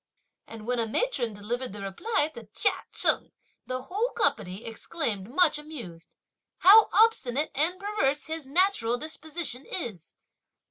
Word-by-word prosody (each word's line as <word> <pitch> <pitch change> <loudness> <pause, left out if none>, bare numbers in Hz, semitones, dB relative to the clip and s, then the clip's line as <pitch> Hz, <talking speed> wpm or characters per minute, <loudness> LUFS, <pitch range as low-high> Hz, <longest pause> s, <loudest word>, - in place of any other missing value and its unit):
and 225 -1 -9
when 245 0 0
a 230 - +1
matron 245 - 0
delivered 220 +3 -4
the 205 - -7
reply 295 - 0
to 230 -3 -11
Chia - - +4 0.2
Cheng; - - +2 0.4
the 255 0 -3
whole 420 - -1
company 185 +4 0
exclaimed 225 - -3
much 305 +1 +3
amused: 235 - -10 0.4
"How 420 +4 +8
obstinate 315 - +3
and 330 +6 0
perverse 395 -9 0
his 320 -3 -5
natural 280 -7 +2
disposition 315 -2 -5
is!" 220 - -5
275 Hz, 135 wpm, -27 LUFS, 225-350 Hz, 0.4 s, How